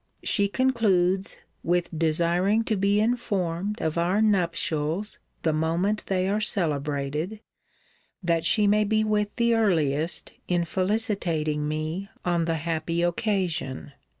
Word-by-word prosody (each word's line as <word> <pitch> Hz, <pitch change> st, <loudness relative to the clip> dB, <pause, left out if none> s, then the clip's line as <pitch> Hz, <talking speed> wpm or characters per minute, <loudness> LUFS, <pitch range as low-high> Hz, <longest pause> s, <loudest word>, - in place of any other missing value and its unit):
She 200 Hz, -1 st, +3 dB
concludes, 200 Hz, -6 st, +1 dB, 0.2 s
with 175 Hz, 0 st, 0 dB
'desiring 170 Hz, +7 st, +2 dB
to 220 Hz, -, 0 dB
be 200 Hz, +1 st, +2 dB
informed 205 Hz, -4 st, -1 dB
of 160 Hz, +1 st, 0 dB
our 180 Hz, +4 st, +1 dB
nuptials 175 Hz, -2 st, 0 dB, 0.2 s
the 160 Hz, -, +2 dB
moment 170 Hz, +7 st, 0 dB
they 185 Hz, -1 st, 0 dB
are 205 Hz, +2 st, 0 dB
celebrated, 150 Hz, 0 st, -1 dB, 0.8 s
that 165 Hz, -2 st, +1 dB
she 210 Hz, +5 st, +3 dB
may 210 Hz, +1 st, +4 dB
be 215 Hz, +1 st, +1 dB
with 210 Hz, -1 st, 0 dB
the 235 Hz, -1 st, +2 dB
earliest 165 Hz, -8 st, +1 dB, 0.2 s
in 175 Hz, -1 st, +1 dB
felicitating 180 Hz, -6 st, -1 dB
me 155 Hz, +6 st, -3 dB, 0.2 s
on 170 Hz, -2 st, +1 dB
the 165 Hz, 0 st, 0 dB
happy 165 Hz, +1 st, -2 dB
occasion.' 175 Hz, -, -1 dB
180 Hz, 125 wpm, -26 LUFS, 160-210 Hz, 0.8 s, may